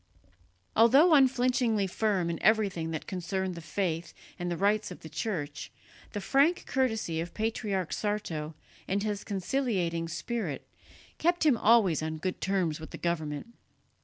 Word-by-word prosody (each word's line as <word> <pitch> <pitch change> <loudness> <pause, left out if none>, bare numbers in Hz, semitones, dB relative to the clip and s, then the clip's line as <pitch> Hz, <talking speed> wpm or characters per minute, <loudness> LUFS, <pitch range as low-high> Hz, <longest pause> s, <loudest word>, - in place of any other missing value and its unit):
Although 275 +10 +6
unflinchingly 250 -6 +3
firm 190 -3 0
in 165 - -5
everything 195 -6 +2
that 160 -1 -4
concerned 190 0 -3
the 170 - -8
faith 170 -1 -3 0.2
and 175 0 -2
the 175 - -2
rights 205 +3 +1
of 180 - -10
the 160 - -9
Church, 155 -3 -4 0.4
the 205 - -2
frank 280 - +2
courtesy 220 -11 0
of 170 +1 -7
Patriarch 215 -4 -1
Sarto 165 -8 -3 0.3
and 200 +1 0
his 210 -1 -2
conciliating 190 -5 -1
spirit 170 - -4 0.5
kept 345 0 +2
him 290 -5 +5
always 215 -8 +4
on 160 0 -3
good 185 +3 -4
terms 185 -5 0
with 160 - -9
the - - -8
government. 160 +3 -3
195 Hz, 145 wpm, -29 LUFS, 170-225 Hz, 0.5 s, Although